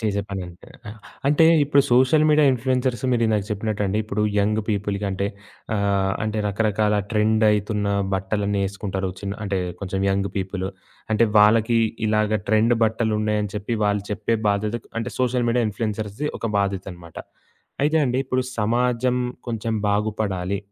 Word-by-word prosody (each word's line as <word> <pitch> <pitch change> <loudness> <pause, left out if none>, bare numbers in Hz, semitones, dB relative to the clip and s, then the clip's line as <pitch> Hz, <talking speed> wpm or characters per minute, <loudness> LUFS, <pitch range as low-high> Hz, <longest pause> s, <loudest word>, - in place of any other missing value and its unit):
చేసే 105 -3 0
పని 95 -1 -4
అంటే, 90 0 -14 0.2
ఆహ్, 105 - -8 0.3
అంటే, 150 +3 +5 0.2
ఇప్పుడు 140 0 +4
సోషల్ 130 +5 +4
మీడియా 150 0 +5
ఇన్‌ఫ్లుయెన్సర్స్ 125 -1 -1
మీరిందాక 110 -4 +1
చెప్పినట్టండి 105 -1 -1
ఇప్పుడు 105 0 -2 0.2
యంగ్ 105 +2 +2
పీపుల్‌కి 100 -1 -1
అంటే 95 +1 -1 0.5
ఆహ్, 100 -1 +1
అంటే, 110 0 -2
రకరకాల 105 0 +1 0.2
ట్రెండ్ 110 0 +2
అయితున్న 105 0 0 0.3
బట్టలన్నీ 100 +1 -1
ఏసుకుంటారు. 95 -1 -4
చిన్ 100 -1 -4
అంటే 100 -1 -1 0.2
కొంచెం 95 -1 -3
యంగ్ 100 0 0
పీపులు. 95 0 -3 0.4
అంటే 115 +2 +4
వాళ్ళకి 110 +2 +5 0.3
ఇలాగా 110 0 +1
ట్రెండ్ 110 +3 +4
బట్టలున్నాయని 105 -2 0
చెప్పి 105 +3 -2
వాళ్ళు 105 -1 +1
చెప్పే 110 +2 0
బాధ్యతకు 105 +3 -1
అంటే 115 +2 -3
సోషల్ 125 -1 +1
మీడియా 120 0 +2
ఇన్‌ఫ్లుయెన్సర్స్‌ది 105 +4 -3
ఒక - - -3
బాధ్యతనమాట. 95 -4 -4 0.7
అయితే 155 +2 +2
అండి 125 -1 0
ఇప్పుడు 130 0 0 0.2
సమాజం 125 +3 +1 0.3
కొంచెం 115 0 -2 0.2
బాగుపడాలి. 100 -2 -1
105 Hz, 140 wpm, -23 LUFS, 100-115 Hz, 0.7 s, అంటే